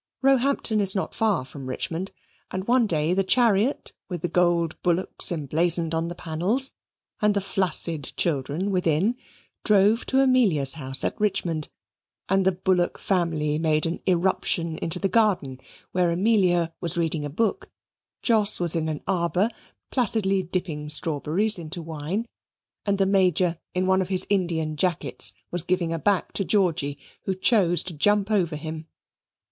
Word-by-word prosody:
Roehampton 270 -5 +2
is 195 0 +3
not 190 - -2
far 210 - 0
from 135 -1 -10
Richmond, 165 +8 -4 0.4
and 185 +1 -5
one 245 -1 +3
day 160 -1 +1
the 195 +1 +1
chariot, 230 +4 +2 0.2
with 175 -4 -5
the - - +1
golden 170 -1 +1
bullocks 180 +2 +2
emblazoned 165 +2 0
on 165 +1 -1
the 175 - -6
panels, 180 +13 -2 0.5
and 210 -1 +2
the - - +2
flaccid 175 -6 -2
children 155 +5 -1
within, 180 +4 +1 0.5
drove 210 +2 +3
to 265 - +2
Amelia's 215 - +4
house 135 -4 +1
at - - -3
Richmond; 170 -7 -1 0.6
and 195 0 +2
the - - +5
Bullock 180 -1 0
family 160 -5 -1
made 155 -1 +1
an 165 +1 -3
irruption 170 -2 0
into 165 - 0
the 195 - 0
garden, 190 - +1 0.3
where 180 -1 +1
Amelia 175 -3 +2
was 170 -1 0
reading 165 -2 0
a 145 - -4
book, 210 +9 -2 0.5
Jos 215 -3 +4
was 175 -1 0
in 160 -1 -1
an 150 -2 -5
arbour 180 +2 0 0.4
placidly 210 -6 +1
dipping 170 -4 -4
strawberries 160 +7 +2
into 170 +2 -5
wine, 165 +6 -4 0.6
and 200 -1 +1
the 195 - +2
Major 185 -3 +2 0.2
in 185 +1 +1
one 190 0 +2
of 185 - -4
his 185 -2 +4
Indian 165 -5 0
jackets 175 +1 +1 0.2
was 175 - -1
giving 175 -1 -1
a 165 - -3
back 200 +1 0
to 195 - -1
Georgy, 170 -8 0 0.3
who 190 - -1
chose 185 -3 +2
to 180 - -7
jump 205 +6 +1
over 175 -7 +1
him. 155 +1 -7
180 Hz, 155 wpm, -24 LUFS, 160-200 Hz, 0.6 s, the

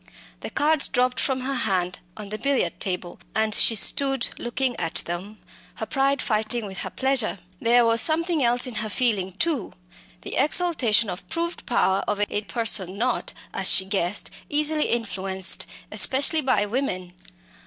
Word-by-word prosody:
The - - -6
cards 305 0 +2
dropped 250 0 0
from 265 -2 -1
her 270 +2 -3
hand 190 -8 -1 0.2
on 210 -2 -8
the 215 +1 -5
billiard 275 -1 -1
table, 180 -3 -4 0.2
and 220 -1 +1
she 225 - +3
stood 270 +4 +2
looking 245 +1 -1
at 165 - -2
them, 185 +5 -6 0.4
her - - -5
pride 275 -1 0
fighting 220 +1 -1
with 190 -1 -7
her - - -3
pleasure. 265 -6 0 0.2
There 235 +1 +4
was 230 0 +3
something 325 0 +2
else 240 +1 +2
in 250 - -6
her 215 - -4
feeling 205 -6 0
too 275 - -2 0.5
the - - -6
exultation 275 - +2
of 180 -1 -7
proved 340 +1 -4
power 190 -5 +1
over 205 0 0
a 205 - -1
person 205 -4 -2
not, 250 +4 -1 0.2
as - - +2
she 190 - +5
guessed, 195 -1 -1 0.2
easily 300 +1 +2
influenced, 190 -4 +2 0.2
especially 280 +4 +4
by 255 -6 +1
women. 200 -6 -3
235 Hz, 160 wpm, -24 LUFS, 200-270 Hz, 0.5 s, she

